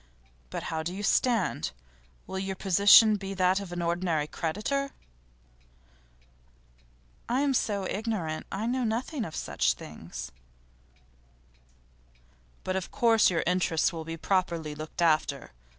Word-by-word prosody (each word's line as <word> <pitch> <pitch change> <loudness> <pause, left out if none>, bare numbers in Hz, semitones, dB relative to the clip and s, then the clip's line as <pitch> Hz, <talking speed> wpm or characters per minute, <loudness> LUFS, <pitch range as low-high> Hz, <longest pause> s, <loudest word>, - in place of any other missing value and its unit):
But - - -5
how 160 - -1
do 175 +3 -4
you 205 - -5
stand? 210 - +1 0.6
Will 190 - -5
your 190 0 -3
position 200 +3 +6
be 195 0 -6
that 185 +1 +3
of 195 -3 -8
an 175 0 -3
ordinary 170 -3 0
creditor?' 215 - -2 2.4
'I 255 +3 +2
am 285 -1 +2
so 205 -5 0
ignorant. 195 -7 -3
I 205 +3 -3
know 250 +2 0
nothing 240 +4 -2
of 160 - -8
such - - 0
things.' - - -9 2.3
'But 185 - -2
of 190 -2 -3
course 225 -2 +4
your 170 -3 0
interests 175 -1 +1
will 165 -1 -5
be 165 +1 -6
properly 170 -3 -1
looked 155 +3 -4
after. 155 - +1
190 Hz, 130 wpm, -28 LUFS, 165-215 Hz, 2.4 s, position